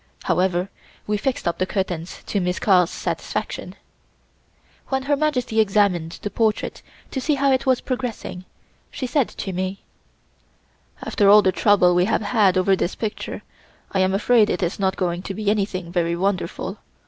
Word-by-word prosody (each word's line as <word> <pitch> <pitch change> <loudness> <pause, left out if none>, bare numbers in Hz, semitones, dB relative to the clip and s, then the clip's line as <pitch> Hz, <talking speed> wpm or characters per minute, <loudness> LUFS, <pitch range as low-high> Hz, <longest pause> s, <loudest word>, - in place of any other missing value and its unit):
However, 180 +1 +1 0.3
we 210 - 0
fixed 255 +2 -2
up 170 - -1
the 185 - 0
curtains 180 -4 -3
to 205 - -1
Miss 180 0 -1
Carl's 180 -4 +4
satisfaction. - - -4 1.1
When 265 -1 -1
Her 290 +1 +2
Majesty 255 -6 0
examined 195 -6 +2
the 205 - -3
portrait 220 -2 0 0.3
to 265 - -3
see 300 +3 +1
how 275 0 +2
it 265 +1 +1
was 255 -2 +3
progressing, 245 -8 -4 0.4
she 260 - -5
said 260 0 +1
to 190 - -6
me: 185 +2 -3 1.2
"After 205 -4 +2
all 210 +1 +8
the 190 - +3
trouble 190 -3 +4
we 180 +1 +3
have 220 - 0
had 205 -4 +3
over 190 +1 +3
this 185 - -2
picture, 210 -1 -5 0.5
I 195 - 0
am 190 +1 +2
afraid 220 +1 +4
it 180 - -1
is 175 +3 -2
not 190 -1 0
going 175 -1 -1
to 195 +1 -6
be 210 -1 0
anything 190 -4 -2
very 170 -1 0
wonderful. 185 +1 -2
195 Hz, 170 wpm, -22 LUFS, 185-220 Hz, 1.2 s, all